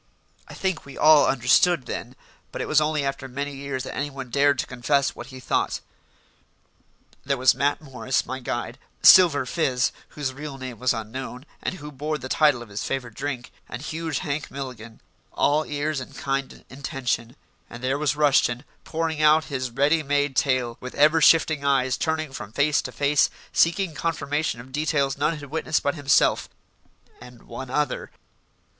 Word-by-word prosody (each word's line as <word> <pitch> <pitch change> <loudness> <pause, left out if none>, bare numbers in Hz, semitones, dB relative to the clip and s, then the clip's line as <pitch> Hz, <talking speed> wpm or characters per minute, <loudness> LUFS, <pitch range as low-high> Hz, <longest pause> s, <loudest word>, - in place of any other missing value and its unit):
I - - -10
think 190 -3 -2
we 140 - -12
all 155 -1 +6
understood 135 +4 +3
then, - - -6 0.4
but - - -6
it - - -3
was 155 0 +4
only 150 -2 0
after 135 -1 -3
many 140 +2 -4
years 135 -1 -4
that - - -6
anyone 135 -3 -5
dared 140 +1 +3
to - - -1
confess 135 +2 0
what 120 - -8
he 130 -1 -10
thought. 125 - -1 1.4
There 140 0 0
was 130 +1 +5
Matt 145 +2 0
Morris, 130 -3 -2
my 130 +1 -5
guide; 120 0 -4 0.2
Silver 160 -8 +8
Fizz, 130 -4 0 0.2
whose 140 -3 -4
real 145 0 -7
name 130 -3 -7
was 125 0 +2
unknown, 125 +3 -5 0.2
and - - -3
who 150 -4 -9
bore 150 +3 -3
the 130 -1 -8
title 145 -6 +3
of 115 - -15
his 100 +1 -4
favourite 125 -5 -4
drink; 135 -3 -4 0.2
and 120 - -6
huge 160 +1 -3
Hank 145 0 -3
Milligan 125 -5 -8 0.3
all 150 +2 +2
ears 150 0 -2
and 130 - -9
kind 135 -1 -3
intention; 130 -3 -3 0.3
and 120 +1 -10
there 135 +2 0
was 150 -2 +1
Rushton, 140 -4 +3 0.2
pouring 160 -1 -2
out 155 +1 +5
his 130 -1 -2
ready 140 +6 +2
made 145 -1 0
tale, 125 -3 +1
with 125 - -8
ever 155 +2 +5
shifting 155 -2 +5
eyes, 130 -2 +2
turning 155 -3 -2
from 105 -5 -7
face 145 +4 +2
to - - -7
face, 145 +1 +2 0.2
seeking 170 +1 +2
confirmation 150 -4 -2
of 130 +3 -12
details 145 -1 0
none 150 +3 0
had 145 -2 -10
witnessed 160 0 0
but 140 - +1
himself 140 -3 +2 0.7
and 125 -1 -13
one 125 +2 -8
other. 145 +1 -1
140 Hz, 175 wpm, -24 LUFS, 130-150 Hz, 1.4 s, Silver